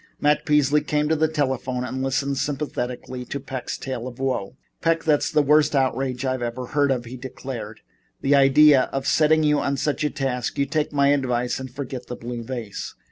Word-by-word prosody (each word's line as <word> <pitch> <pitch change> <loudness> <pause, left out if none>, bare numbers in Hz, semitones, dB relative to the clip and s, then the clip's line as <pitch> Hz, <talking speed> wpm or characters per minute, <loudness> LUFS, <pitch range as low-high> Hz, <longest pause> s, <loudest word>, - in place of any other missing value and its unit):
Matt 150 +3 +2
Peasley 150 0 +4
came 150 0 0
to 160 - +3
the 160 +1 +2
telephone 130 -4 -1
and 130 +1 -4
listened 135 +1 -1
sympathetically 130 -3 -3
to 140 - -4
Peck's 130 -2 -5
tale 130 -2 -5
of 125 -1 -9
woe. 130 -4 -2 0.2
"Peck, 165 0 +1
that's 150 -2 +2
the 150 -1 +3
worst 150 +1 +4
outrage 130 -1 0
I 130 -1 -1
ever 120 +2 -3
heard 145 +2 +1
of," 125 -3 0
he 125 +2 -8
declared. 120 -3 -7 0.4
"The 135 - +2
idea 140 0 +6
of 135 0 -3
setting 155 +2 +4
you 150 -1 +3 0.2
such 150 +2 -1
a 150 - +2
task. 135 -4 -2
You 140 - +2
take 150 +1 -1
my 140 -1 +3
advice 125 -4 0
and 130 0 -6
forget 130 -1 -6
the 125 - -5
blue 120 0 -6
vase." 115 -4 -6
135 Hz, 190 wpm, -23 LUFS, 125-150 Hz, 0.4 s, idea